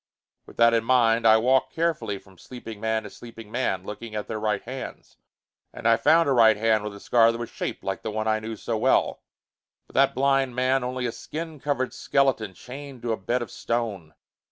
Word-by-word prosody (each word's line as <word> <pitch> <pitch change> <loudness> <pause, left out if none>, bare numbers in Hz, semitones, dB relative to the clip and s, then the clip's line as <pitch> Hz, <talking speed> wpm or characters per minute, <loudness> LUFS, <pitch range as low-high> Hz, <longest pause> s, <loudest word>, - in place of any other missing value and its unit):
With - - -15
that 115 0 +5
in 115 -1 +2
mind, 115 -2 +3
I 110 0 +7
walked 130 +4 +2
carefully 165 -11 -1
from 95 -2 -19
sleeping 115 -4 -9
man 110 0 0
to 105 - -8
sleeping 115 -2 -12
man, 105 -7 -1
looking 110 +2 -8
at 105 - -3
their 110 - -4
right 105 -2 -1
hands. 130 +2 -8 0.5
And - - -4
I 115 - +6
found 155 +8 +4
a - - +2
right 115 -4 +5
hand 110 -1 +2
with 105 -1 -5
a - - -10
scar 115 +2 +4
that 115 - -5
was 120 -1 -6
shaped - - -5
like 95 -1 -3
the - - -4
one 110 +1 -2
I 110 0 +2
knew 110 +1 -6
so 110 +1 -3
well. - - +2 0.6
But - - -21
that - - +3
blind 135 -1 +2
man, 130 +1 +1
only 125 0 -3
a 120 - -1
skin 160 +4 -7
covered 135 -2 -1
skeleton, 125 -8 0
chained 135 +1 -10
to 120 - -1
a - - +1
bed 120 +6 -1
of - - -10
stone! 105 -10 -3
115 Hz, 215 wpm, -25 LUFS, 110-130 Hz, 0.6 s, I